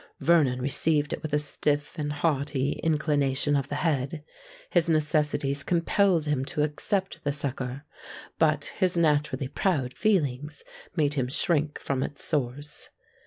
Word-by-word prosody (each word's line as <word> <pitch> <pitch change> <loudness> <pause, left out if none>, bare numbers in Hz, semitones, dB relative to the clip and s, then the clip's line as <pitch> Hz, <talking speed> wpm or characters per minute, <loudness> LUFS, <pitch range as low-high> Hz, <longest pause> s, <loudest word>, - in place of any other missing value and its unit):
Vernon 150 -7 +3
received 145 +3 +1
it - - -4
with 155 - -5
a 150 - +3
stiff 145 0 -1
and 145 -1 -2
haughty 145 -2 0
inclination 145 -3 +1
of 140 -1 0
the 145 - -4
head:—his 165 - -2
necessities 150 -3 +1
compelled 175 +1 +2
him 145 -3 0
to 150 +2 -1
accept 190 +6 -1
the 145 - 0
succour; 135 -1 -4 0.5
but 155 -2 +1
his 185 -2 +2
naturally 150 -4 +1
proud 140 -4 -1
feelings 150 - 0 0.3
made 150 -4 +2
him 130 -4 0
shrink 150 +2 +1
from 135 -2 -2
its 145 +1 -3
source. 145 0 -2
150 Hz, 135 wpm, -27 LUFS, 140-160 Hz, 0.5 s, Vernon